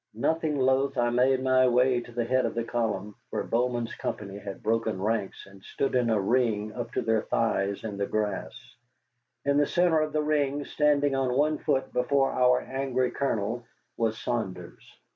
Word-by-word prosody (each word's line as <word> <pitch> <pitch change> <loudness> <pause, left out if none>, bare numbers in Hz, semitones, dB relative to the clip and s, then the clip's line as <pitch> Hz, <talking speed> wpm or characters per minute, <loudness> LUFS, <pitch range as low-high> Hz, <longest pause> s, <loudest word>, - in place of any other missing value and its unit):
Nothing 155 +5 0
loath, 135 +1 +2
I 120 0 +2
made 130 +2 +2
my 130 0 +4
way 125 0 +3
to 120 - -12
the 120 0 -1
head 130 +2 +2
of - - -6
the 115 - -1
column, 110 -4 -2 0.2
where - - -2
Bowman's 120 0 -1
company 100 -1 -5
had 100 -1 -8
broken 110 -3 0
ranks 105 0 -2
and 100 -1 -16
stood 135 - -2
in 125 -2 +2
a 110 -2 +2
ring 110 -1 +1
up 120 -1 -5
to - - -1
their 110 -1 +2
thighs 100 -3 -1
in 105 -3 -5
the 100 0 -1
grass. 105 -3 -4 0.7
In 140 0 +2
the 145 -1 +3
centre 175 -2 +3
of 155 0 -1
the 155 0 0
ring, 145 -1 0
standing 145 -1 +2
on 130 -1 0
one 150 +1 +2
foot 130 0 -1
before 135 +2 +2
our 125 0 +3
angry 130 -1 -1
Colonel, 120 -3 -2 0.3
was 110 -1 0
Saunders. 115 -7 -4
125 Hz, 180 wpm, -27 LUFS, 110-135 Hz, 0.7 s, my